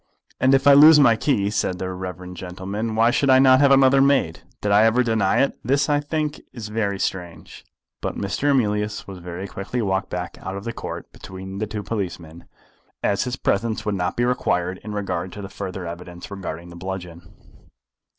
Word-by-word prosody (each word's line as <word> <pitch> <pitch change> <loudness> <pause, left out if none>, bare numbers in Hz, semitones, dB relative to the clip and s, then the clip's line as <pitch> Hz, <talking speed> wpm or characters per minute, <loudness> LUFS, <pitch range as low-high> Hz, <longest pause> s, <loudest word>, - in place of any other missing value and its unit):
"And 130 +1 +4
if 135 - +1
I 140 - +8
lose 150 +2 +9
my 120 -5 +6
key," 110 -4 0
said 100 -3 -1
the 95 0 -4
reverend 90 0 -7
gentleman, 95 +5 -5
"why 115 +2 +4
should 140 +2 +1
I 130 - +7
not 130 -1 +6
have 140 -1 +5
another 135 0 +5
made? 135 -12 +2 0.2
Did 105 - -1
I 105 +2 +6
ever 115 +3 +4
deny 110 -3 +2
it? 140 - -1
This, 140 +4 +1
I 145 0 +3
think, 150 0 -3
is 115 -4 -7
very 105 -2 -1
strange." 85 -5 -5 0.4
But - - -3
Mr. 100 +9 -1
Emilius 105 -5 0
was 95 -2 -8
very 90 +2 -6
quickly 100 +6 -5
walked 95 -3 -1
back 90 -1 -5
out 95 +1 -5
of 100 - -7
the 115 - -4
Court - - -7
between 95 +1 -8
the 110 - -2
two 105 0 -5
policemen, 85 -6 -5 0.6
as 100 +3 +1
his 125 0 -3
presence 110 -2 -1
would 105 - 0
not 90 -2 -2
be 120 - +2
required 95 -7 0
in 105 - -6
regard 100 -2 -3
to 105 - -8
the 95 - -7
further 95 -1 -6
evidence 85 +2 -8
regarding 90 -3 -6
the 85 - -11
bludgeon. 90 -1 -6
100 Hz, 200 wpm, -22 LUFS, 95-125 Hz, 0.6 s, lose